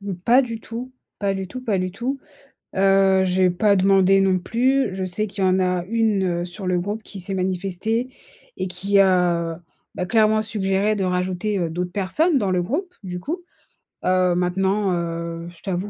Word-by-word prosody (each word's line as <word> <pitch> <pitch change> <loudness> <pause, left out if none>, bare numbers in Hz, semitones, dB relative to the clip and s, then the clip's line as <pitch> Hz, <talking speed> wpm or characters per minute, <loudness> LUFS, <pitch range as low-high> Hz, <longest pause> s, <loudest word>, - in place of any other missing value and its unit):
Mmh, 200 -2 -4
pas 250 +3 +5
du 230 -2 -5
tout, 245 +3 -7 0.3
pas 200 -1 0
du 190 -1 -4
tout, 255 +7 -7
pas 210 -6 0
du 185 0 -1
tout. 250 +8 -3 0.6
Heu, 195 0 +4
j’ai 185 0 +3
pas 200 +3 +3
demandé 195 0 +4
non 190 -1 +3
plus. 245 +3 +1
Je 190 0 -3
sais 200 +4 -1
qu'il 195 -1 -3
y - - +4
en 185 +1 +3
a 180 -1 0
1 220 -3 +1 0.2
heu, - - -3
sur 180 +2 -7
le 180 -1 +1
groupe 205 +4 -4
qui 195 -2 -8
s'est 195 +2 -4
manifestée 190 +6 -1 0.5
et - - -2
qui 195 +2 0
a, 175 -3 +2 0.3
bah, 180 - -3
clairement 215 -1 +3
suggéré 205 0 0
de 195 - -1
rajouter, 185 +3 -1
heu, 170 -2 -1
d'autres 180 +1 -3
personnes 275 - +1
dans 200 -5 0
le 180 -1 +1
groupe, 355 - -3
du 180 -1 -5
coup. 340 - -4 0.6
Heu, 185 -1 +3
maintenant, 190 +3 +1
heu, 170 0 -4
je 170 -2 -17
t'avoue 190 +2 -3
190 Hz, 195 wpm, -22 LUFS, 180-215 Hz, 0.6 s, pas